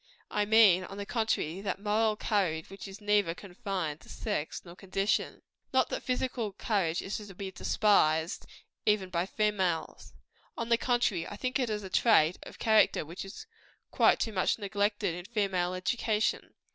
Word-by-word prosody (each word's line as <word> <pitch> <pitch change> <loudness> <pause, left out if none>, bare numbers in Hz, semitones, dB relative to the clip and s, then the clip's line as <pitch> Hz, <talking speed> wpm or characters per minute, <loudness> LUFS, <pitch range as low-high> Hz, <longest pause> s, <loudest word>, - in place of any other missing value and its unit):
I 210 0 +1
mean, 205 -4 +6
on 195 - -9
the 200 - -4
contrary, 200 -7 -1
that 195 -2 -3
moral 215 +1 +1
courage 185 -7 -1
which 195 0 -8
is 195 +1 -10
neither 205 -5 +2
confined 185 -6 -4
to - - -17
sex 150 - -3
nor 170 0 -11
condition. 195 +2 -1 0.3
Not 260 -1 +3
that - - -3
physical 250 -4 -2
courage 190 -5 0
is 195 - -3
to 205 -4 -10
be 190 +1 -5
despised, 165 -4 +2 0.4
even 205 -3 +2
by 175 +1 0
females. 195 -6 -1 0.4
On 230 0 -3
the 235 - +5
contrary, 240 -10 +1
I - - -7
think 255 +5 -2
it 250 -3 0
is 210 -1 -2
a 190 - -7
trait 180 -8 +4
of - - -11
character 220 -7 +3
which 170 +4 -7
is 195 +1 -9 0.5
quite - - +4
too 225 - -1
much 185 - +1
neglected 205 -2 -1
in 175 +1 -7
female 190 -5 0
education. 215 +3 -1
200 Hz, 170 wpm, -30 LUFS, 180-215 Hz, 0.5 s, mean